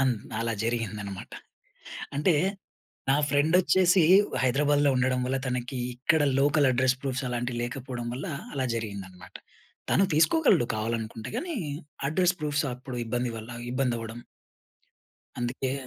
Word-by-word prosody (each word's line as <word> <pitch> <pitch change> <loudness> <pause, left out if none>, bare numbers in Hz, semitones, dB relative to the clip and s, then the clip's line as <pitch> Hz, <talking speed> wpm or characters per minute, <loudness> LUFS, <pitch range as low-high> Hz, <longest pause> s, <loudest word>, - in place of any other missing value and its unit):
అన్ 130 -2 +3 0.3
అలా 115 0 0
జరిగిందన్నమాట. 105 -4 -3 0.8
అంటే 150 +5 +3 0.8
నా 135 - +5
ఫ్రెండ్ 145 +4 +2
వచ్చేసి, 185 -1 +4 0.4
హైదరాబాద్‌లో 145 +2 +3
ఉండడం 125 0 +2
వల్ల 130 +1 0
తనకి 125 +1 -3 0.2
ఇక్కడ 145 +5 +2 0.2
లోకల్ 145 0 +4
అడ్రెస్ 130 +1 +2
ప్రూఫ్స్ 130 -1 -2
అలాంటివి 120 0 -2
లేకపోవడం 125 -1 -5
వల్ల 130 - -5 0.3
అలా 135 -2 -1
జరిగిందన్నమాట. 95 -5 -6 0.6
తను 195 - +4
తీసుకోగలడు 190 - +4
కావాలనుకుంటే 110 0 -3
గాని 335 +6 -3 0.5
అడ్రెస్ 180 +3 +2
ప్రూఫ్స్ 150 +1 0
అప్పుడు 125 0 -8
ఇబ్బంది 120 +1 -1
వల్ల 110 +1 -8 0.2
ఇబ్బంది 130 -1 +1
అవ్వడం 115 +1 -7 1.2
అందుకే 125 +2 -2
130 Hz, 120 wpm, -27 LUFS, 120-145 Hz, 1.2 s, నా